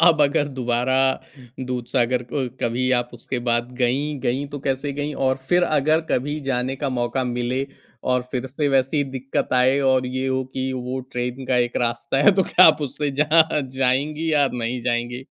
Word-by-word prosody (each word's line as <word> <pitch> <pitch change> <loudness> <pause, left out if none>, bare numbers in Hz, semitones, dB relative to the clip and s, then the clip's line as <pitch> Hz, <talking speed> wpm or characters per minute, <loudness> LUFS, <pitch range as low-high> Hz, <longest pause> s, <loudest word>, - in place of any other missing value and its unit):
अब 165 -3 +6
अगर 145 +1 +2
दोबारा 125 +1 0 0.7
दूधसागर 125 0 0
क 135 -4 -1
कभी 125 +2 0
आप 120 -1 0
उसके 120 +2 -5
बाद 120 +1 +1
गईं, 140 +4 0
गईं 135 +4 -1
तो 145 - -6
कैसे 135 +1 -2
गईं? 145 +1 -3
और 130 -1 +1
फिर 175 0 +4
अगर 155 -1 +2
कभी 145 +4 0
जाने 130 +1 -1
का 140 0 -2
मौका 130 +1 -1
मिले 125 +2 -2 0.4
और 125 -1 +2
फिर 130 0 -3
से 145 +3 -1
वैसी 135 +2 +2
दिक्कत 135 +1 -2
आए 130 +2 +4
और 130 -1 +2
ये 130 +1 -2
हो 130 0 0
कि 130 0 -2
वो 130 +1 -4
ट्रेन 125 +2 -3
का 125 - +1
एक 120 0 0
रास्ता 120 +3 -1
है 200 - +7
तो 190 - +3
क्या 185 0 +6
आप 155 - +5
उससे 145 +1 -2
जा 155 0 +4 0.2
जाएँगी 150 +5 0
या 145 -2 +4
नहीं 120 +1 -3
जाएँगी? 120 +1 -2
130 Hz, 185 wpm, -22 LUFS, 125-145 Hz, 0.7 s, है